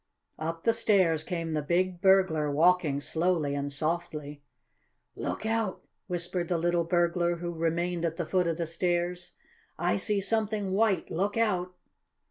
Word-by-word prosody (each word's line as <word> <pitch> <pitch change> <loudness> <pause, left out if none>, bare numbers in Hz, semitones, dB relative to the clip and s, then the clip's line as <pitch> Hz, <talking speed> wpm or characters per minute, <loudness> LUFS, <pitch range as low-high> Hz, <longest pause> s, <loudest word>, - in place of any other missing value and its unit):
Up 165 +1 -4
the 230 - +3
stairs 185 -8 +3
came 165 -2 -3
the 155 - 0
big 175 +3 0
burglar 190 -6 +4
walking 160 -1 +3
slowly 160 0 0
and 140 0 -2
softly. 150 -1 -3 0.7
"Look - - -4
out!" 225 -3 -1 0.2
whispered 175 -1 -2
the 175 - 0
little 170 +1 +1
burglar, 175 0 +1
who 175 0 -5
remained 170 +1 -1
at 165 -1 -1
the 170 - -2
foot 180 +1 +1
of 165 -1 -1
the 170 - -1
stairs. 175 +1 -2 0.4
"I 100 - +1
see 205 - +1
something 210 -1 -1
white! 200 0 +1
Look 200 +6 -1
out!" 185 -5 0
175 Hz, 150 wpm, -29 LUFS, 165-185 Hz, 0.7 s, burglar